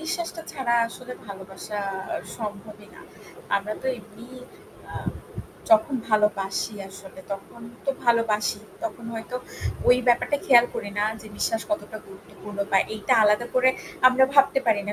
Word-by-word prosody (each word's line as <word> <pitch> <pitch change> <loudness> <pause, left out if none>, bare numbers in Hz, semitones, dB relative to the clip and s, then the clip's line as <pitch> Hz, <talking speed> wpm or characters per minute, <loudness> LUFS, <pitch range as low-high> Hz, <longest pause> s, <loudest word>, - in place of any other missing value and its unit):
বিশ্বাসটা 335 0 -3
ছাড়া 245 -3 0
আসলে 250 +2 -9
ভালোবাসা 195 +1 -7 0.3
আ - - -1 0.2
সম্ভবই 210 -1 -7
না। - - -13 0.6
আমরা 205 +2 -3
তো - - -4
এমনি 220 +2 -13 0.7
আ - - -9 0.8
যখন 220 +6 +5 0.2
ভালোবাসি 210 -1 +1
আসলে 195 0 -12
তখন 195 +4 -8 0.2
তো 275 - +2
ভালোবাসি। 225 -3 +2 0.2
তখন 285 -8 -5
হয়তো 225 +2 -5 0.5
ওই 245 - +8
ব্যাপারটা 245 +4 +3
খেয়াল 240 -2 +8
করি 205 - -4
না 205 - +3 0.2
যে - - -11
বিশ্বাস 225 0 0
কতটা 310 -8 -2
গুরুত্বপূর্ণ 200 +1 -12
বা 195 - +7 0.2
এইটা 210 - 0
আলাদা 210 +3 +3
করে 255 0 +5 0.4
আমরা 260 +1 +5
ভাবতে 275 -1 +6
পারি 215 -3 +4
না 205 - 0
215 Hz, 145 wpm, -25 LUFS, 205-250 Hz, 0.8 s, ওই